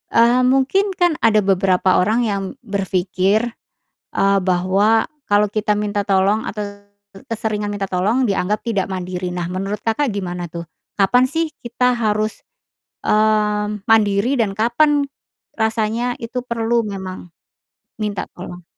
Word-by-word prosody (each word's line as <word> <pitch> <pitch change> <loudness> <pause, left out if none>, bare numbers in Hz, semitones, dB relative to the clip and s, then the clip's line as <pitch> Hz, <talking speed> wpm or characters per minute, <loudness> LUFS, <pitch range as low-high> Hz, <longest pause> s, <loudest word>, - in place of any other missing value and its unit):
eee, 235 +2 +5
mungkin 355 +10 +2
kan 350 -1 +3
ada 215 -2 +3
beberapa 190 -1 +3
orang 220 +6 +2
yang 200 -3 -1 0.2
berpikir, 195 +2 0 0.6
eee, 195 0 +2
bahwa 190 +5 +2 0.2
kalo 205 +1 +4
kita 210 0 0
minta 205 -1 -1
tolong 200 +2 +2
atau 205 -1 -6 0.3
ke 195 - -13
keseringan 215 -2 -2
minta 200 -1 -3
tolong 215 +8 +1
dianggap 200 +1 0
tidak 200 -5 0
mandiri. 180 -1 -4
Nah 175 -1 -3
menurut 195 +3 -3
Kakak 230 +3 0
gimana 180 -3 -4
tuh, 170 0 -7 0.3
kapan 245 +6 +4
sih 325 +5 -1 0.2
kita 250 +1 +1
harus, 215 -1 -1 0.6
mmm, 210 -1 +1
mandiri 220 +4 +3
dan 210 -4 +1
kapan 285 +7 +3 0.5
rasanya 225 +2 0
itu 240 +2 -3
perlu 235 -1 0
memang 190 -3 -6 0.7
minta 210 -2 -2
tolong? 180 0 -9
210 Hz, 130 wpm, -19 LUFS, 195-230 Hz, 0.7 s, eee